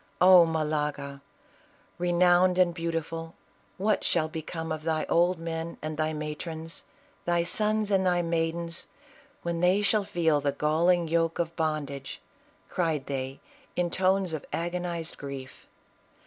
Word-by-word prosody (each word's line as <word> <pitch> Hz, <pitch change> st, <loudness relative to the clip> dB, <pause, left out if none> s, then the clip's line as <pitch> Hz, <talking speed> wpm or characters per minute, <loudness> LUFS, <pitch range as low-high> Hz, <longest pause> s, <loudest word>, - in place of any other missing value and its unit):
"Oh 180 Hz, -2 st, +8 dB
Malaga! 150 Hz, -3 st, -2 dB, 0.8 s
renowned 180 Hz, +1 st, +4 dB
and 180 Hz, -2 st, +4 dB
beautiful, 165 Hz, -1 st, -4 dB, 0.4 s
what 210 Hz, +2 st, +1 dB
shall 160 Hz, -2 st, +2 dB
become 160 Hz, +1 st, -5 dB
of 155 Hz, -1 st, -2 dB
thy 155 Hz, -1 st, 0 dB
old 175 Hz, +2 st, +3 dB
men 165 Hz, 0 st, -4 dB
and 155 Hz, 0 st, -4 dB
thy 155 Hz, +1 st, 0 dB
matrons, 160 Hz, +2 st, -5 dB, 0.4 s
thy 175 Hz, -1 st, +2 dB
sons 215 Hz, +2 st, 0 dB
and 190 Hz, -1 st, +3 dB
thy 175 Hz, -1 st, +2 dB
maidens, 165 Hz, 0 st, -2 dB, 0.6 s
when 170 Hz, -1 st, -2 dB
they 185 Hz, +4 st, +3 dB
shall 210 Hz, 0 st, +3 dB
feel 165 Hz, -7 st, +1 dB
the 140 Hz, 0 st, 0 dB
galling 165 Hz, +4 st, +2 dB
yoke 165 Hz, 0 st, +1 dB
of 170 Hz, -1 st, -2 dB
bondage," 150 Hz, -4 st, -3 dB, 0.5 s
cried 160 Hz, -6 st, -1 dB
they, 135 Hz, -1 st, -4 dB, 0.3 s
in 175 Hz, -1 st, 0 dB
tones 190 Hz, -1 st, +2 dB
of 155 Hz, -, -3 dB
agonized 170 Hz, -1 st, -3 dB
grief. 135 Hz, -2 st, -8 dB
165 Hz, 135 wpm, -28 LUFS, 155-175 Hz, 0.8 s, Oh